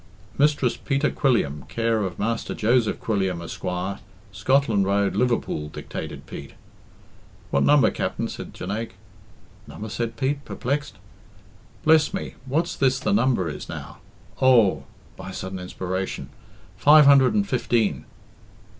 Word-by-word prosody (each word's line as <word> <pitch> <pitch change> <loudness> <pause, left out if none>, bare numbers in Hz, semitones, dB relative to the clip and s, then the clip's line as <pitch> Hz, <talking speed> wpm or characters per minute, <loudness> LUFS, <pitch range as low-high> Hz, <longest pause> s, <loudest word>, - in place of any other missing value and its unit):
"Mistress 145 -4 +2
Peter 140 +1 0
Quilliam, 75 - +1
care 115 -1 0
of 95 -3 -3
Master 115 +2 -2
Joseph 115 0 +2
Quilliam, 95 -5 -1
Esquire, 90 +3 -4 0.3
Scotland 110 0 +2
Road, 100 0 +1
Liverpool" 120 -11 0
dictated - - -7
Pete. 70 - -9 1.0
"What 70 - +2
number, 145 - +5
Capt'n?" - - -2
said - - -8
Jonaique. 105 +2 -5 0.7
"Number?" 110 +1 -7
said 115 +1 -3
Pete, 140 +3 -1
perplexed. 145 +4 -3 0.9
"Bless 160 +3 +4
me, 190 - -5
what's 160 +6 0
this 130 -1 +2
the 185 +8 0
number 130 - +2
is 75 - -6
now? - - -8 0.4
Oh," 110 - +4 0.3
by - - -8
a - - -8
sudden 95 0 -5
inspiration, 95 -5 -4 0.5
"five 150 +5 +7
hundred 140 +6 +6
and 205 -1 +2
fifteen." 115 - 0
115 Hz, 130 wpm, -24 LUFS, 95-140 Hz, 1.0 s, five